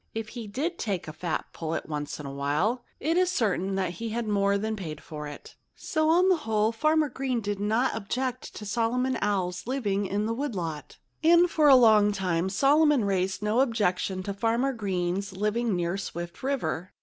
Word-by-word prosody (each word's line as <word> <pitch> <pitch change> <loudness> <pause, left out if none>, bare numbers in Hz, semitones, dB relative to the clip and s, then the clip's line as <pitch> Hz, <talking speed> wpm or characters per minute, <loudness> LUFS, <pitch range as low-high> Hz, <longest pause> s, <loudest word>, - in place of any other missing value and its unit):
If 225 -1 -4
he 230 -1 -7
did 305 - -3
take 195 -7 -2
a 155 - -6
fat 170 -1 -3
pullet 165 0 -4
once 150 -1 -4
in 150 - -7
a 140 - -5
while, 150 - 0 0.2
it 325 +4 0
is 365 0 +3
certain 195 - 0
that 185 -3 0
he 225 +6 -4
more 200 -2 +2
than 220 +2 -2
paid 160 -7 -6
for 150 -1 -7
it. 145 - -10 0.2
So, 315 0 0
on 355 +3 +5
the 370 -2 +4
whole, 220 -6 +1
Farmer 310 +5 +2
Green 260 -2 -2
did 205 -2 -3
not 220 +5 +1
wood 205 -1 -3 2.4
lot. 160 -5 -5 0.3
And 340 +2 +6
for 305 -2 +4
a 275 - +9
long 215 -4 +6
time 185 -2 -1
Solomon 285 +3 +4
raised 190 0 -1
no 210 +3 +1
objection 200 -6 0
to 200 - -3
Farmer 230 +6 0
Green's 195 -2 -2
living 210 +1 0
near 175 +1 -1
Swift 170 -2 -6
River. 255 -10 -2
210 Hz, 165 wpm, -27 LUFS, 180-255 Hz, 2.4 s, a